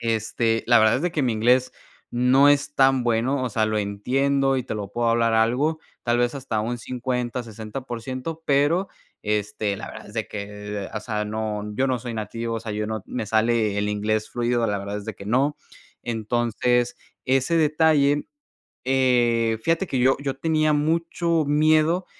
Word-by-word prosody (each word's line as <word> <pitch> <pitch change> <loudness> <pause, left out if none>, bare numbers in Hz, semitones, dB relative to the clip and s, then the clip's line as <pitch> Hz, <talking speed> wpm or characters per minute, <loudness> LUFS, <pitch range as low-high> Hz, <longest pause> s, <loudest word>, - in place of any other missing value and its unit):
este, 115 0 0
la 120 0 +6
verdad 110 0 +4
es 135 - -3
de 175 -1 -1
que 150 - 0
mi 125 -3 +1
inglés 125 +4 +2 0.4
no 125 +3 +5
es 145 0 +2
tan 135 -2 +3
bueno, 120 +4 +1
o 125 - -2
sea, 110 0 +1
lo 110 0 0
entiendo 135 +7 +1
y 130 - -1
te 120 - -4
lo 105 -2 -4
puedo 120 -1 0
hablar 115 0 +2
algo, 125 +8 +1 0.2
tal 120 0 +1
vez 120 +1 +1
hasta 120 -6 -2
un 120 +3 -3
50, 125 0 -3
60 110 +2 -7
por 120 -3 -6
ciento, 130 +6 -5
pero, 145 +7 +2 0.3
este, 105 -1 -1
la 110 - -7
verdad - - -11
es 105 - -13
de 110 -2 -2
que, 105 -1 -6
o 110 - -2
sea, 105 -1 -3
no, 105 -1 -3
yo 130 +5 +1
no 130 -2 0
soy 120 -1 -6
nativo, 115 +2 -4
o - - -4
sea, 110 -1 -5
yo 105 0 -2
no, 110 -1 -4
me 115 - -4
sale 110 -1 +1
el 105 0 0
inglés 110 +1 -1
fluido, 120 -1 0
la 105 -1 -1
verdad 100 +1 -5
es 105 - -9
de 110 - -4
que 100 - -11
no. 135 +7 +1 0.5
Entonces, 120 +1 0 0.3
ese 135 +5 +2
detalle, 150 -2 +3 0.6
eh, 120 -3 +2
fíjate 165 +4 +1
que 135 - -2
yo 130 +2 +4
yo 140 -2 -2
tenía 155 +1 +1
mucho 165 +2 +1
miedo 155 +4 +3
120 Hz, 190 wpm, -24 LUFS, 110-135 Hz, 0.6 s, la